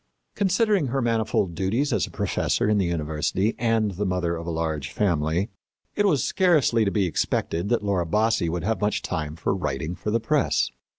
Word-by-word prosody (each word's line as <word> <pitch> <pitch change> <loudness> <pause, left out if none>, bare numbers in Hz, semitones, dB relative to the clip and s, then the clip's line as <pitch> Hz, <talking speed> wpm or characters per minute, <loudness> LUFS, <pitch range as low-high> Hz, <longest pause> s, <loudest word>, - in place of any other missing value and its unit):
Considering 200 - +2
her 135 +2 -1
manifold 110 -6 0
duties 110 - 0
as 105 - +1
a - - -11
professor - - 0
in 105 -1 +3
the 95 - +1
university 85 +5 -1
and 115 -3 +1
the 95 +2 -3
mother 90 -3 0
of 85 0 -7
a - - -1
large 80 -3 -2
family, 85 -1 0 0.5
it 205 -1 +2
was 145 -10 +2
scarcely 155 -11 +3
to 100 - +2
be 100 -1 +1
expected 85 +2 -1
that 120 -3 +1
Laura 95 -4 0
Bassi 105 -2 +1
would 85 0 -3
have 110 +3 -1
much 105 0 0
time 80 -4 -3
for 80 - -1
writing 75 -1 -3
for 105 - -5
the 115 +2 +2
press. 150 +4 +1
100 Hz, 190 wpm, -25 LUFS, 85-115 Hz, 0.5 s, in